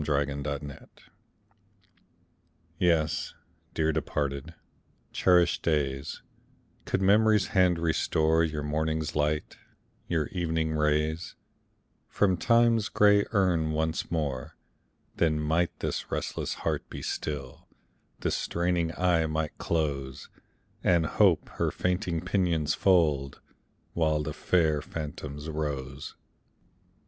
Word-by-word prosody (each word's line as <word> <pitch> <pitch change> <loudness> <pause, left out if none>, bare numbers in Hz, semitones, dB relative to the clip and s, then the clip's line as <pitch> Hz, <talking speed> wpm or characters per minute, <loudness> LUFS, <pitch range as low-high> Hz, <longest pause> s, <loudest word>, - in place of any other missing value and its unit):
DEPARTED 70 -1 -1
DAYS 70 -1 -5 2.0
YES, 80 -3 +1 0.4
dear 80 -1 +1
departed, 75 0 -3 0.6
cherished 90 -2 +3
days, 70 -4 -1 0.6
Could 95 - -1
Memory's 105 +1 +4
hand 90 -2 +3
restore 80 0 +2
Your 75 -2 -2
morning 80 +1 -1
light, 75 0 -1 0.5
your 80 -3 0
evening 80 -3 -1
rays, 75 +1 0 0.7
From 95 -3 +2
Time's 115 +2 +3
gray 105 -1 +4
urn 90 -6 +1
once 80 +1 -1
more, 70 -6 -3 0.6
Then 80 -2 +2
might 80 +3 0
this - - -3
restless - - -3
heart - - -1
be - - -7
still, 70 -4 -5 0.5
This - - 0
straining 85 -1 0
eye 85 -3 +2
might 80 -1 -2
close, 70 -5 -2 0.5
And 85 -2 +3
Hope - - +3
her - - +2
fainting 90 -2 -1
pinions 85 -5 +1
fold, 75 -8 +2 0.5
While 80 -2 +1
the 75 0 -4
fair 80 -4 +1
phantoms 75 -1 -6
rose. 70 -4 -4
80 Hz, 100 wpm, -28 LUFS, 75-85 Hz, 2.0 s, Memory's